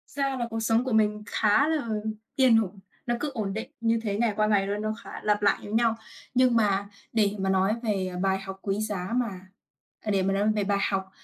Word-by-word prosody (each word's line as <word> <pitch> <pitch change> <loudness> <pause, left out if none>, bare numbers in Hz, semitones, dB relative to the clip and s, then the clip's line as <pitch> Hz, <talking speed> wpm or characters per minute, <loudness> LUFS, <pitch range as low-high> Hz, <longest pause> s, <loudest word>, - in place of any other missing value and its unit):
Thật 280 - 0
ra 270 -1 0
là 240 -1 -2
cuộc 225 0 -3
sống 225 +1 +2
của 260 - -3
mình 210 -1 +2
khá 210 +7 +3
là 310 -6 0 0.5
yên 255 -4 +5
ổn, 195 0 -9 0.3
nó 240 - 0
cứ 295 +2 -2
ổn 210 -5 -2
định 225 +6 -5
như 230 0 +2
thế 205 -2 -1
ngày 230 -1 +1
qua 215 0 +2
ngày 200 -2 +2
luôn, 205 +1 -2
nó 215 0 -1
khá - - -8
lặp 210 -1 +2
lại 200 -1 +4
giống 205 +1 -4
nhau. 230 -1 +3 0.4
Nhưng 255 -1 +4
mà 200 -3 +2 0.3
để 210 -3 +2
mà 190 0 0
nói 190 +2 +3
về, 200 -4 0
ờ, - - -5
bài 190 0 +1
học 195 0 -8
quý 200 0 -1
giá 205 -2 -3
mà 230 -7 -1 0.6
à, 215 - -2
để 195 -2 +2
mà 195 +1 +1
nói 205 +2 +2
về 210 - +1
bài 200 0 +1
học 190 -1 -2
210 Hz, 245 wpm, -27 LUFS, 195-230 Hz, 0.6 s, yên